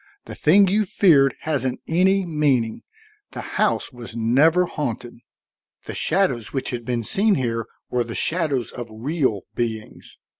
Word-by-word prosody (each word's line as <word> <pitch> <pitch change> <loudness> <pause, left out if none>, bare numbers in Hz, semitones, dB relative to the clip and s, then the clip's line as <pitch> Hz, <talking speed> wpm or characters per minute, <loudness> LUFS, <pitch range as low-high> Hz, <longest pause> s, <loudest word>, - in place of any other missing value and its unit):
The - - -8
thing 195 +6 +4
you 210 +3 +2
feared 165 -10 +4
hasn't 130 -5 -1
any 190 +3 +2
meaning. 140 -9 0 0.5
The - - -6
house - - +1
was 120 -2 -10
never 145 +10 +3
haunted; 125 -7 -4 0.7
the - - -6
shadows 130 - 0
which 135 -1 -3
have 120 -2 -5
been 120 -1 -2
seen 200 - +2
here 115 -3 -2 0.2
were 125 -1 +1
the 115 0 -7
shadows 150 - -1
of 120 -2 -7
real 120 - -1
beings. 110 -2 -5
135 Hz, 145 wpm, -22 LUFS, 120-170 Hz, 0.7 s, thing